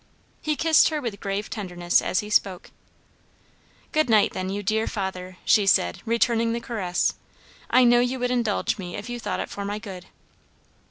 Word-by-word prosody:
He 305 -1 -1
kissed 320 +2 +4
her 310 -1 -2
with 230 -7 -5
grave 200 0 -3
tenderness 175 -4 0
as 185 - 0
he 210 0 -9
spoke. 190 -3 0 1.2
"Good 310 -4 +1
night 215 -2 +4
then, 185 0 -3
you 200 +1 -3
dear 220 +3 0
father," 185 -3 -5
she 205 -2 +4
said, 85 - +2
returning 230 0 +2
the 235 - -2
caress. 195 -7 -1 0.6
"I 255 - +5
know 240 0 +5
you 250 +2 0
would 250 0 -1
indulge 230 -4 0
me 175 -2 -6
if 210 +4 -6
you 240 - -4
thought - - -3
it - - -6
for 200 - -5
my 205 +1 -3
good." 195 -4 -9
210 Hz, 180 wpm, -24 LUFS, 190-240 Hz, 1.2 s, I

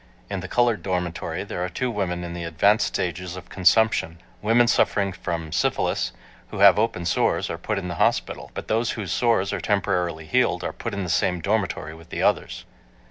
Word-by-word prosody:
In 100 - -2
the 90 - -6
colored 120 +1 +2
dormitory 90 -3 -3
there 90 - -4
are 90 - -2
two 125 +6 -2
women 90 -5 -2
in 85 0 -5
the 85 0 -5
advanced 85 +7 +3
stages 90 0 -3
of 90 -2 -10
consumption. 95 -3 +2 0.2
Women 115 +3 +4
suffering 100 -4 +2
from, 85 -2 -4
syphilis, - - 0 0.4
who - - -8
have 100 0 +7
open 105 -6 0
sores, 85 - +1
are 85 - -5
put 105 +4 -2
in 95 -2 -3
the 90 - -3
hospital. - - 0
But - - -6
those 115 +2 +1
whose 100 -6 -5
sores 105 -4 +2
are 100 - -2
temporarily 90 -5 0
healed 80 - +1
are - - -3
put 115 -3 -5
in 100 - -2
the 90 - -4
same 90 +1 +1
dormitory 100 -5 -1
with 80 +1 -14
the - - -3
others. - - 0
95 Hz, 195 wpm, -24 LUFS, 85-105 Hz, 0.4 s, have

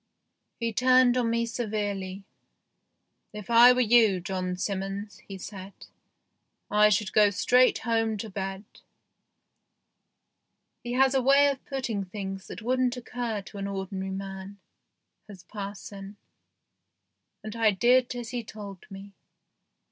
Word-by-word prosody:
He 230 -1 -2
turned 255 +1 +4
on 245 -2 +1
me 235 0 0
severely. 205 -4 -4 0.6
" - - -51
If 210 +2 -9
I 235 +2 +8
were 250 0 +2
you, 225 -5 +4
John 185 0 -3
Simmons," 195 +2 -4
he 195 - -7
said, 195 0 -9 0.5
" - - -38
I 210 - +7
should 205 -1 0
go 210 -1 +5
straight 250 +6 +3
home 225 -1 0
to 220 - -5
bed." 195 0 -5 2.2
He 240 - -4
has 265 +1 +3
a 265 - +2
way 280 +2 +5
of 270 - -8
putting 245 -7 -3
things 195 0 -7
that - - -9
wouldn't 255 +1 0
occur 235 -4 -4
to 200 - -10
an 200 - -3
ordinary 190 -1 -4
man, 195 +1 -7 0.7
has 195 -4 -12
parson, 200 0 -8 1.3
and 215 +1 -7
I 225 -1 +3
did 245 +5 +3
as 240 -1 -6
he 245 -2 -4
told 205 -4 -10
me. 195 +1 -10
210 Hz, 135 wpm, -27 LUFS, 195-240 Hz, 2.2 s, I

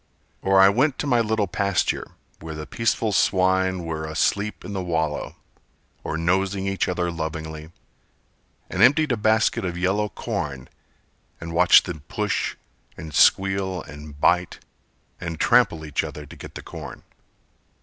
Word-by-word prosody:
Or 95 0 +3
I 95 - +8
went 130 +8 +2
to - - -3
my 125 -4 +3
little 110 -2 +1
pasture, 100 +1 -1 0.3
Where 80 0 -7
the 75 0 -6
peaceful 115 +1 0
swine 95 -1 +2
were 80 -1 -4
asleep 100 +6 -1
in 100 - -6
the 95 - -2
wallow, 80 -4 -2 0.7
Or 75 - -3
nosing 95 +3 0
each 95 -2 -1
other 90 -1 -1
lovingly, 80 -1 -6 1.0
And - - -3
emptied 150 +2 +5
a - - +3
basket 110 +1 +2
of 90 -2 -3
yellow 100 +4 0
corn, 65 -8 -5 0.7
And 85 0 -7
watched 90 +1 +6
them 85 -4 -5
push - - -2 0.4
and 80 -1 -8
squeal 95 +1 +3
and 75 0 -11
bite, 90 +3 +2 0.6
And 85 -2 -5
trample 110 -10 +3
each 75 - -1
other 75 - -7
to - - -13
get - - -11
the - - -7
corn. - - -9
90 Hz, 150 wpm, -23 LUFS, 80-100 Hz, 1.0 s, I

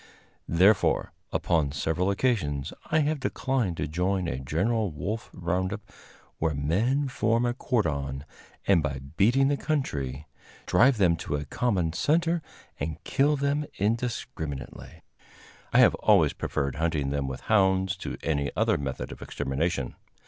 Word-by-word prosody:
Therefore, 95 +5 +3 0.2
upon 80 -5 +1
several 80 +6 0
occasions, 95 - 0 0.2
I 155 0 +3
have 150 0 0
declined 130 -8 -1
to - - -2
join 90 +3 0
a 65 -5 -2
general 100 - 0
wolf 100 +9 -4
round 90 +2 -1
up, 105 0 -4 0.6
where 80 -2 0
men 110 - +1
form 115 -2 +1
a 120 - +1
cordon, 70 - -1 0.4
and, 95 -4 +4
by 70 -3 -2 0.2
beating 125 +8 +4
the 145 0 +1
country, 75 - -2 0.4
drive 125 0 +4
them 90 -5 +4
to 75 - -3
a 75 0 -3
common 90 - 0
center 165 - +1 0.4
and 80 -1 -3
kill 145 +2 +2
them 140 +1 0
indiscriminately. 100 - -3 0.7
I - - +3
have - - +7
always - - +4
preferred 70 -2 -2
hunting 80 -4 0
them 70 -1 -1
with 65 -1 -5
hounds 95 -3 +2
to - - -5
any 70 -3 0
other - - +2
method 70 -2 -4
of - - -10
extermination. 70 0 -2
90 Hz, 140 wpm, -27 LUFS, 75-120 Hz, 0.7 s, have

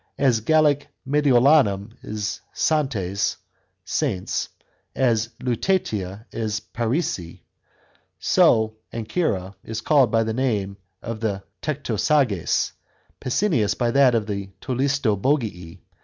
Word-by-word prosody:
As 130 -5 +3
Gallic 145 +3 +3 0.2
Mediolanum 135 -7 +4
is 105 -1 -4
Santones 105 - 0 0.5
(Saintes), 110 -11 -1 0.5
as 115 -4 +2
Lutetia 110 - -1
is 110 -2 -2
Parisii, 110 - -3 0.8
so 110 -1 +3
Ancyra 110 - -2
is 110 0 -5
called 140 -5 +4
by 115 +1 +2
the 110 0 -2
name 105 -6 -1 0.3
of 115 -1 -5
the 100 -3 -2 0.2
Tectosages, 135 - +1 0.5
Pessinus 125 - +1
by 120 -2 +1
that 130 -2 +5
of 110 -2 +1
the 100 -2 -4
Tolistobogii. 125 - -1
115 Hz, 95 wpm, -23 LUFS, 105-140 Hz, 0.8 s, that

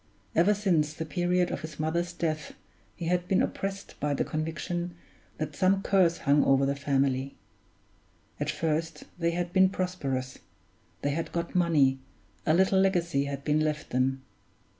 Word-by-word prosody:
Ever 185 +6 +4
since 165 -7 +1
the 160 - -4
period 175 +3 +1
of - - -3
his 155 -1 -8
mother's 170 +3 0
death 155 -3 -3 0.4
he 170 - -6
had 180 +1 0
been 190 - +3
oppressed 195 0 -4
by 145 0 0
the - - +1
conviction 170 +2 -3 0.4
that 150 -1 -4
some 190 +3 +2
curse 180 -4 +3
hung 145 +1 +3
over 135 0 +4
the 140 +1 0
family. 135 -1 0 1.0
At - - -1
first 165 +1 -1 0.2
they 170 -1 +2
had 175 +1 -2
been 190 0 +5
prosperous, 140 -10 -3 0.6
they 145 - +1
had 165 +3 -3
got 170 0 -3
money, 150 -7 +3 0.5
a 155 - +5
little 190 +1 +4
legacy 170 -7 +2
had 140 -1 -5
been 150 +1 +2
left 155 -1 -2
them. 130 +1 0
165 Hz, 160 wpm, -28 LUFS, 145-180 Hz, 1.0 s, been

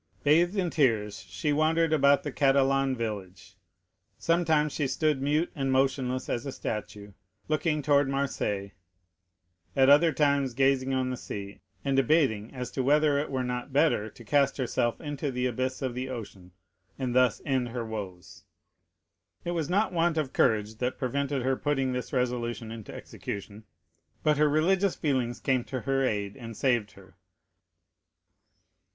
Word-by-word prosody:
Bathed 170 +6 +4
in 180 -4 0
tears 110 -9 +1
she 110 - -1
wandered 160 +2 +2
about 140 -1 +4
the 145 - -4
Catalan 135 -1 +2
village. 100 -5 -6 0.6
Sometimes 160 -3 +2
she 145 - 0
stood 150 +1 0
mute 150 +5 +1
and 135 -4 -1
motionless 130 -1 0
as 120 - -2
a 140 - -4
statue, 105 -3 -5 0.4
looking 155 0 0
towards 145 -1 +3
Marseilles, 105 -8 -2 1.0
at 135 0 +5
other 160 +3 +6
times 140 -3 +1
gazing 135 0 +2
on 130 -1 0
the 125 - -4
sea, 100 -2 -7 0.2
and 135 -1 +1
debating 135 -6 +2
as 125 -2 -6
to 130 - -2
whether 145 +2 +3
it 145 - -3
were 130 -2 -1
not 125 +1 -4
better 135 -6 +2
to 115 - -15
cast 140 +2 +2
herself 120 -2 -1
into 145 -2 -4
the 125 -1 -2
abyss 130 +2 -2
of 130 -2 -2
the 130 +2 -4
ocean, 100 -7 -8 0.5
and 130 -2 -2
thus 125 -5 +3
end 130 -3 0
her 115 0 -4
woes. 95 -6 -7 1.0
It 175 - -1
was 165 -4 -2
not 200 +2 +1
want 165 -1 +1
of 145 -4 -1
courage 110 0 +1
that 125 +1 -2
prevented 140 +1 -1
her 130 +1 +1
putting 135 -2 0
this 125 0 -4
resolution 120 -3 -2
into 115 -2 -8
execution; 100 +2 -7 0.6
but 150 -1 +3
her 150 0 +4
religious 180 +6 +2
feelings 130 -5 -1
came 130 -2 +1
to 130 -2 -4
her 135 -1 0
aid 105 -5 -1
and 115 -3 -9
saved 120 -6 +1
her. - - -18
130 Hz, 160 wpm, -28 LUFS, 120-145 Hz, 1.0 s, other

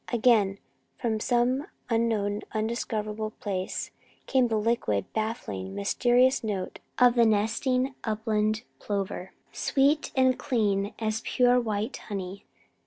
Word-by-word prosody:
Again, 220 -5 +3 0.4
from 220 -2 -1
some 250 - +1 0.2
unknown, 220 -3 0
undiscoverable 215 -1 -2
place, 190 -3 -3 0.3
came 260 -2 +3
the 225 -2 0
liquid, 210 - 0
baffling, 100 - -3
mysterious 245 - +3
note 195 -4 -3 0.2
of 245 -1 +6
the 240 -1 +4
nesting 230 +5 +1
upland 215 0 0 0.2
plover, 195 -2 -3 0.2
sweet 285 +3 +1
and 260 -1 +3
clean 205 -5 0
as 220 0 -1
pure 250 -1 +3
white 215 +1 -2
honey. 195 -2 -6
220 Hz, 110 wpm, -27 LUFS, 205-245 Hz, 0.4 s, of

